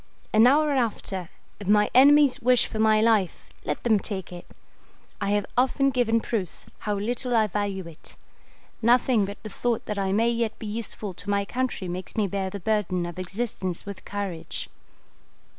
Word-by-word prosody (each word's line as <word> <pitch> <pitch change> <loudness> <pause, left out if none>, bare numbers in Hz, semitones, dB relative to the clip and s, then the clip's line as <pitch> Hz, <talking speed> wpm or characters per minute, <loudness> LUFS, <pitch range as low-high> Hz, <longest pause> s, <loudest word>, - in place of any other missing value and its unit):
An 220 +2 +7
hour 300 +3 +4
after, 215 - -2 0.3
if 200 - -8
my 210 0 +4
enemies 285 +1 +6
wish 250 0 +4
for 220 - -5
my 220 0 +4
life, 215 -6 +1 0.2
let 150 - -3
them 220 -4 +3
take 190 -2 -6
it. 175 - -10 0.7
I 200 - 0
have 205 -1 +1
often 265 +2 +2
given 230 -3 +2
proofs 205 -8 -3
how 210 -1 -2
little 240 +4 -1
I 220 -1 +4
value 200 -2 -3
it. 165 -1 -11 0.7
Nothing 235 -2 +3
but 200 +1 -7
the 215 - -6
thought 235 +2 -2
that 210 -1 -3
I 190 -1 0
may 225 +4 +2
yet 230 -2 -1
be - - -8
useful 210 -2 -5
to 200 +3 -9
my 200 0 +1
country 245 -5 -3
makes 180 +1 -5
me 215 - +2
bear 195 0 -2
the 200 - -6
burden 185 -3 0
of 175 +1 -7
existence 185 -2 -3
with 200 -1 -8
courage. 200 -5 -5
210 Hz, 175 wpm, -25 LUFS, 195-235 Hz, 0.7 s, An